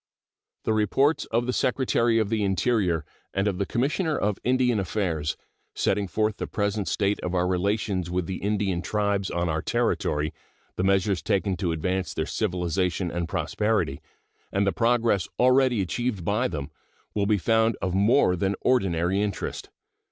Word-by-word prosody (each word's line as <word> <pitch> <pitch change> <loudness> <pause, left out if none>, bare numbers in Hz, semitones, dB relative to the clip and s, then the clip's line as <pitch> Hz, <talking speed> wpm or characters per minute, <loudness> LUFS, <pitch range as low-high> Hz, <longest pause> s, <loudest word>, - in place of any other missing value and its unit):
The 110 - +1
reports 135 +8 +2
of 120 +2 0
the 125 - -1
Secretary 120 -3 +2
of 110 -3 +1
the 110 -2 0
Interior 95 - +1 0.3
and 95 +1 +1
of 100 -2 -1
the 100 - -1
Commissioner 150 +6 0
of 105 -1 -1
Indian 125 -2 +2
Affairs, 85 -5 -1 0.4
setting 100 0 +1
forth 110 +2 0
the - - -4
present 105 -1 -1
state 100 0 0
of 90 +1 -3
our 90 0 +2
relations 95 0 0
with 90 0 -1
the 95 +2 -4
Indian 100 -3 -1
tribes 100 -1 0
on 85 0 -1
our 80 -1 -1
territory, 75 +1 0 0.4
the 90 - -1
measures 95 0 +2
taken 95 -1 0
to 85 -1 -1
advance 90 +2 -2
their 80 - -1
civilization 90 -2 -1
and 85 -1 -3
prosperity, 105 -7 0 0.5
and 100 +1 +1
the 100 - +2
progress 115 -5 +2
already 125 -2 +4
achieved 105 -1 -2
by 105 +6 +1
them, 75 -4 -5 0.4
will 100 -1 0
be 105 -1 +3
found 110 +3 +2
of 95 -2 -2
more 100 0 +4
than 95 +3 0
ordinary 95 -6 +2
interest. 105 -2 -3
100 Hz, 160 wpm, -26 LUFS, 90-110 Hz, 0.5 s, already